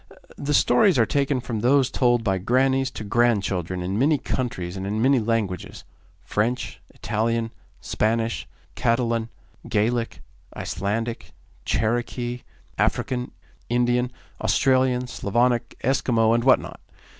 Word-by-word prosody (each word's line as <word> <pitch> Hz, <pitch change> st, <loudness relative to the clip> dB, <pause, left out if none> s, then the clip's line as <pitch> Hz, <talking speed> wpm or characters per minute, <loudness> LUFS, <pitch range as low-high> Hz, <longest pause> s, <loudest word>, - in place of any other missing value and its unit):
The 145 Hz, +1 st, -1 dB
stories 135 Hz, +9 st, +4 dB
are 115 Hz, -, +5 dB
taken 140 Hz, 0 st, 0 dB
from 115 Hz, -3 st, -4 dB
those 130 Hz, +3 st, +3 dB
told 120 Hz, -2 st, +2 dB
by 95 Hz, -3 st, 0 dB
grannies 130 Hz, +5 st, +2 dB
to 110 Hz, -, -7 dB
grandchildren 100 Hz, -6 st, 0 dB
in 95 Hz, +4 st, -2 dB
many 150 Hz, +4 st, +3 dB
countries 115 Hz, -11 st, -3 dB
and 95 Hz, 0 st, -4 dB
in 105 Hz, +2 st, -2 dB
many 130 Hz, +3 st, +4 dB
languages 110 Hz, -5 st, -2 dB, 0.4 s
French, 120 Hz, +4 st, -2 dB
Italian, 115 Hz, +1 st, -1 dB, 0.3 s
Spanish, 115 Hz, +1 st, -1 dB, 0.3 s
Catalan, 115 Hz, -1 st, 0 dB, 0.4 s
Gaelic, 115 Hz, +3 st, 0 dB, 0.3 s
Icelandic, 105 Hz, -5 st, -3 dB, 0.3 s
Cherokee, 120 Hz, +2 st, -1 dB, 0.4 s
African, 125 Hz, -1 st, 0 dB, 0.4 s
Indian, 120 Hz, +1 st, +1 dB, 0.3 s
Australian, 130 Hz, -2 st, +2 dB
Slavonic, 120 Hz, +1 st, 0 dB
Eskimo, 115 Hz, -3 st, +2 dB
and 115 Hz, 0 st, +1 dB
what 130 Hz, -, +6 dB
not. -, -, -9 dB
120 Hz, 115 wpm, -24 LUFS, 110-125 Hz, 0.4 s, what